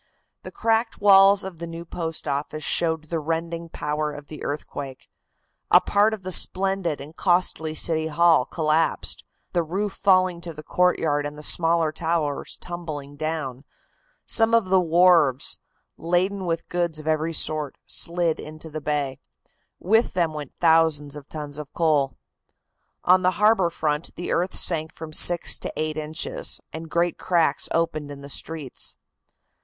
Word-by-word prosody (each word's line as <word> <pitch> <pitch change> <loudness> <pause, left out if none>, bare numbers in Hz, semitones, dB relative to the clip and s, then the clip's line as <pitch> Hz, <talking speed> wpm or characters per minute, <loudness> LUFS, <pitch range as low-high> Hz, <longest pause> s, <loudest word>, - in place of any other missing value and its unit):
The - - -8
cracked 225 0 0
walls 195 0 +6
of 185 -4 -8
the 170 - -5
new 165 +1 -8
Post 165 -2 -5
Office 145 +2 -3
showed 160 -2 +1
the 165 - 0
rending 165 +2 -3
power 150 0 -3
of 145 -1 -11
the 155 - -9
earthquake. 140 -2 -6 0.6
A - - +8
part 210 +2 +2
of 200 - -17
the 185 - -5
splendid 190 -3 +1
and 145 +4 -10
costly 175 -4 +1
City 160 0 +2
Hall 160 -3 +4
collapsed, 155 +1 0 0.3
the 175 - +2
roof 190 +5 -3
falling 185 -3 +2
to 170 -1 -7
the 155 - -9
courtyard 150 -4 +1
and 145 0 -9
the 150 - -6
smaller 165 0 +3
towers 160 -3 -2
tumbling 155 -5 -7
down. 150 -4 -4 0.6
Some 225 0 +3
of 220 -5 +2
the 190 -1 +4
wharves, 170 -5 +3 0.4
laden 185 +3 0
with 165 -1 -2
goods 175 -3 -1
of 155 - -10
every 155 +1 0
sort, 155 -3 +4
slid 170 -1 -1
into 155 +1 -9
the 155 0 -5
bay. 140 -3 -2 0.6
With 220 +6 +2
them 170 -3 0
went 150 -3 -7
thousands 160 -3 +3
of 145 -1 -11
tons 150 -1 -6
of 150 -1 -8
coal. 150 -5 +1 0.9
On 185 +1 +5
the 185 +1 +1
harbor 210 -4 +4
front 150 -1 -3
the 175 - -5
earth 180 +3 0
sank 160 -2 +1
from 160 -1 -9
six 175 +2 +3
to - - -5
eight 155 0 -2
inches, 155 +1 -2
and 160 0 -7
great 170 +1 0
cracks 165 -5 +1
opened 160 -3 -1
in 140 -1 -9
the 140 - -9
streets. 150 -2 -4
165 Hz, 160 wpm, -24 LUFS, 150-175 Hz, 0.9 s, A